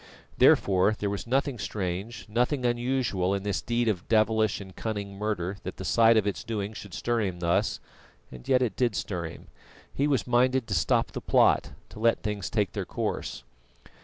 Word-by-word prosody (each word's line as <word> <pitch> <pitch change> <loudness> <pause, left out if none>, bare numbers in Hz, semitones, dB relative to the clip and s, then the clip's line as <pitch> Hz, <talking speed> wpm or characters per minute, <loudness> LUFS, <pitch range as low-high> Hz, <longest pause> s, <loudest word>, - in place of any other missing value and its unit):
Therefore 95 +2 +4
there 100 -1 -2
was 100 -1 -5
nothing 135 0 0
strange, 100 +2 -4
nothing 125 +4 0
unusual 120 -6 0
in 100 - -4
this 100 -1 -1
deed 120 0 0
of 95 -5 -1
devilish 110 -1 +2
and 95 -2 -11
cunning 105 -3 -4
murder 100 -2 -2
that - - -7
the 95 - -6
sight 115 +3 +5
of 105 - +2
its 100 -4 -2
doing 105 -2 -3
should 100 -3 -9
stir 120 +3 0
him 95 -4 -2
thus, 85 0 +1 0.5
and 65 -1 -11
yet 130 -1 +4
it 110 -6 -1
did 120 -4 +1
stir 90 -4 -3
him. 80 - -10 0.4
He 140 - +1
was 140 -4 +1
minded 125 +1 +2
to 110 - -4
stop 85 - +1
the - - -5
plot, - - +3 0.2
to - - -11
let 115 +1 +2
things 105 -4 -3
take 105 -5 0
their - - -3
course. - - -4
105 Hz, 190 wpm, -27 LUFS, 95-120 Hz, 0.5 s, sight